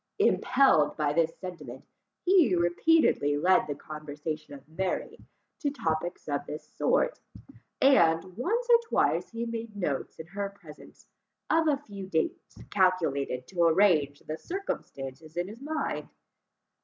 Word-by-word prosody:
Impelled 260 - +3
by 150 -2 +1
this 165 0 +1
sentiment, 180 -2 -8 0.4
he 350 - +5
repeatedly 175 - +3
led 185 +3 +3
the 145 - -3
conversation 150 0 -7
of 140 0 -15
Mary 180 +4 -3 0.4
to 295 - 0
topics 175 - -3
of 145 -1 -1
this 150 - -7
sort; - - +1 0.6
and, 165 -12 +5
once 450 - -1
or 475 -1 +7
twice, - - +1
he 230 0 -4
made 230 -2 -5
notes 150 -8 -3
in 160 - -7
her 200 +4 -4
presence, 155 -5 -14 0.5
of 325 0 +3
a 290 -2 +3
few 200 -9 -9
dates 160 -4 -2
calculated 160 -9 +1
to 180 -3 -3
arrange 165 -5 +3
the 155 +1 -6
circumstances 155 - -6
in 175 +1 -1
his 220 +5 -10
mind. 310 +2 -3
175 Hz, 135 wpm, -28 LUFS, 155-245 Hz, 0.6 s, or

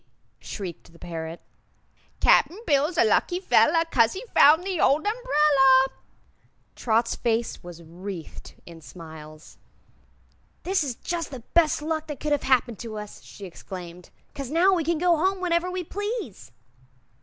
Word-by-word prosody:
shrieked 180 -5 -8
the - - -17
parrot; 165 -1 -7 0.8
"Cap'n 355 - +4
Bill's 300 +3 +1
a - - +5
lucky 290 - +1
fellah, 335 -3 +3
'Cause 230 -3 +3
he 395 +6 -7
found 310 +5 +6
the 375 -3 -2
old 295 +6 +3
umbrella!" 300 - +4 0.9
Trot's 230 0 0
face 230 -1 -2
was 175 -1 -11
wreathed 175 +1 -9
in 165 -1 -12
smiles. 155 -2 -12 1.0
"This 375 -2 0
is 260 -5 -4
jus' 340 +3 -4
the 260 -5 -10
best 315 -3 +3
luck 315 0 -3
that 295 -3 -7
could 300 - -3
have 290 - +1
happened 245 -4 +2
to 225 -2 -7
us," 210 -1 -9
she 200 - -11
exclaimed, 180 -1 -10 0.2
"'cause 275 -3 -6
now 350 +6 +3
we 345 -3 0
can 335 +1 0
go 345 0 +2
home 380 +4 0
whenever 350 0 0
we 365 0 -4
please." 395 - -6
275 Hz, 150 wpm, -25 LUFS, -, 1.0 s, found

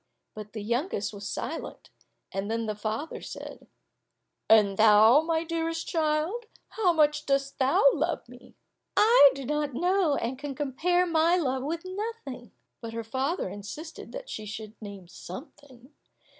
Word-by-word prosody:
But 215 -1 -9
the 215 -2 -5
youngest 235 - -1
was 200 0 -6
silent. - - -6 0.4
Then 220 +4 -2
the 215 - -2
father 215 +9 -4
said, - - -9 0.8
"And 210 -3 +6
thou, 220 +5 +7
my 320 0 0
dearest 330 0 -3
child, 325 +8 0 0.2
how 405 -5 +2
much 300 -2 +2
dost 275 0 0
thou 265 +1 +3
love 320 -2 -2
me?" 245 +1 -15 0.4
"I 440 - +8
do 275 -1 -6
not 295 -1 -1
know, 355 -1 +2
and 255 +1 -3
can 285 -1 -5
compare 325 +6 +1
my 335 +1 +3
love 265 -6 0
with 330 +6 -4
nothing." 370 - -6 0.3
But 230 -1 -7
her 230 0 -4
father 265 - -2
insisted 295 +12 -8
that - - -7
she 215 - -6
should 215 0 -7
name 200 -4 -9
something. 255 - -12
275 Hz, 145 wpm, -28 LUFS, 220-330 Hz, 0.8 s, I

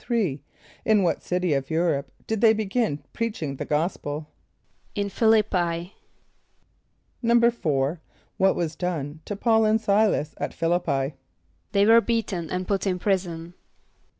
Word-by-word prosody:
= - - -27 0.8
In 210 -2 +5
what 170 - 0
city 180 -2 0
of 135 -1 -1
Europe 160 -4 0
did 220 -2 -2
they 225 -1 +7
begin 215 - -1
preaching 190 - -3
the - - -4
gospel? 150 -1 -2 0.7
=In 200 -1 -2
Ph[)i] 225 - +1 0.2
l[)i]p´p[=i].= 175 -3 -2 1.3
=4.= 205 - +2 0.4
What 190 0 +3
was 165 -2 -2
done 155 -4 -3
to 205 - -4
P[a:]ul 225 +2 +3
and 215 +1 +3
S[=i]´las 205 -7 +2
at - - -3
Ph[)i] 165 - -3
l[)i]p´p[=i]? 140 -4 -1 0.6
=They 200 0 +4
were 230 +2 +7
beaten 215 -8 -2
and 185 0 -3
put 200 0 0
in 185 -1 +1
prison. 175 -3 -2
180 Hz, 140 wpm, -25 LUFS, 160-215 Hz, 1.3 s, they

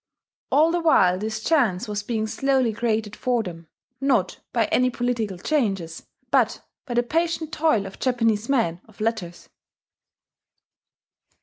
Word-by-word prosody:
All 315 +3 +5
the 350 - +1
while 185 - +4
this 220 +1 -4
chance 240 - +2
was 210 -1 -2
being 220 0 -2
slowly 260 0 +1
created 220 -1 -1
for 245 -3 0
them 165 -4 -9 0.3
not 240 -10 +1
by 230 -2 +2
any 255 0 +3
political 235 -5 -2
changes, 195 - -1 0.2
but - - +2 0.2
by 240 - -3
the 240 - +3
patient 325 +3 -1
toil 305 -10 +2
of 195 - -10
Japanese 230 -3 +1
men 205 -11 +1
of 220 - -21
letters. 215 -6 -3
225 Hz, 135 wpm, -24 LUFS, 205-260 Hz, 0.3 s, All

